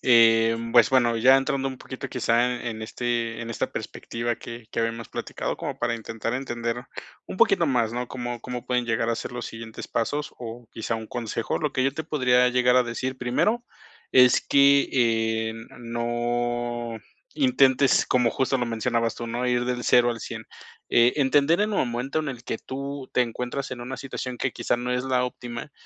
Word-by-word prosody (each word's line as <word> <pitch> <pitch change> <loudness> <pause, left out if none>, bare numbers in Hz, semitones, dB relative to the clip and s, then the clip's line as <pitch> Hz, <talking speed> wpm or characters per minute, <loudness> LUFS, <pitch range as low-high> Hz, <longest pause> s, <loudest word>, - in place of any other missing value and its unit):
Eh, 115 -2 +5 0.2
pues 120 -3 +7
bueno, 120 -3 +3
ya 130 +3 +7
entrando 135 0 0
un 130 - -7
poquito 130 0 -7
quizá 125 0 +1
en 120 - -8
en 110 -1 -4
este 120 0 -2
en 115 - -6
esta 115 - -2
perspectiva 120 0 -4
que 115 -1 -9
que 115 - -2
habíamos 115 0 -3
platicado, - - -4
como - - -4
para 115 - 0
intentar 115 0 -4
entender 120 -2 -3 0.4
un - - -7
poquito 170 - +4
más, 120 -4 +1
¿no? 125 0 -3
Cómo 120 -2 -5
cómo 125 0 -6
pueden 125 -1 0
llegar 115 0 0
a - - +1
ser - - -5
los 120 -1 -5
siguientes 115 0 -8
pasos, 145 +6 -2
o 120 0 -8
quizá 115 +1 -3
un 110 -1 -5
consejo. 115 -1 -3
Lo 150 -2 -1
que 130 - +1
yo 135 - +2
te 160 - -4
podría 125 -5 +3
llegar 125 0 +3
a 125 - +6
decir 130 +2 -4
primero, 210 - +1 0.5
es 125 -1 +6
que 140 0 +4
eh, 110 -2 +1 0.3
no 120 0 -2 0.4
intentes, 140 - +4
como 125 -2 +2
justo 135 0 0
lo 120 - -1
mencionabas 115 0 0
tú, 120 - -6
no 120 +2 -2
ir 120 0 +1
del 125 -1 -2
0 120 0 +5
al 115 - -5
100 - - -6 0.5
Eh, 120 +1 +5
entender 145 +6 +3
en 215 0 0
el - - +1
momento 125 +4 -1
en 155 -2 -2
el 125 -3 -7
que 115 - -3
tú 140 0 -6
te 125 - +5
encuentras 125 +3 -4
en 125 -1 -6
una 130 +2 -5
situación 130 -2 -5
que 130 +1 -1
quizá - - 0
no 125 +1 -2
es 125 - 0
la 125 -1 +1
óptima, 120 +2 -6
120 Hz, 195 wpm, -25 LUFS, 115-130 Hz, 0.5 s, pues